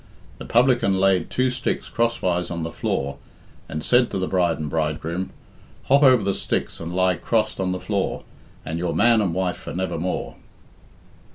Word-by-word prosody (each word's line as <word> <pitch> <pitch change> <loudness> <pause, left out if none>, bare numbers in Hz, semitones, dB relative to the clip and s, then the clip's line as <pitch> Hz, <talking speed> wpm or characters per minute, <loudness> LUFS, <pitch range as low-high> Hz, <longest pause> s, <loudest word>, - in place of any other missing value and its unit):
The - - -7
publican 120 -6 +3
laid 95 -3 +2
two 130 0 +1
sticks 125 0 -2
crosswise 90 -7 0
on 85 -2 -4
the 80 - -4
floor, 70 -2 -2 0.5
and 80 -1 -4
said 125 +4 +4
to - - -3
the 95 - 0
bride 90 -3 +1
and 75 - -4
bridegroom 80 +4 -2 0.5
"Hop 140 +2 +4
over 130 -6 +6
the 100 0 +1
sticks - - -2
and 85 0 -5
lie 90 0 +2
crossed 110 -3 0
on 95 -1 0
the 90 - -2
floor, 100 -1 -2 0.4
And 80 +3 -3
you're 85 -2 -2
man 115 +4 +4
and 95 -4 0
wife 90 +1 -1
for - - -8
nevermore." 90 -1 -3
95 Hz, 175 wpm, -23 LUFS, 85-110 Hz, 0.5 s, over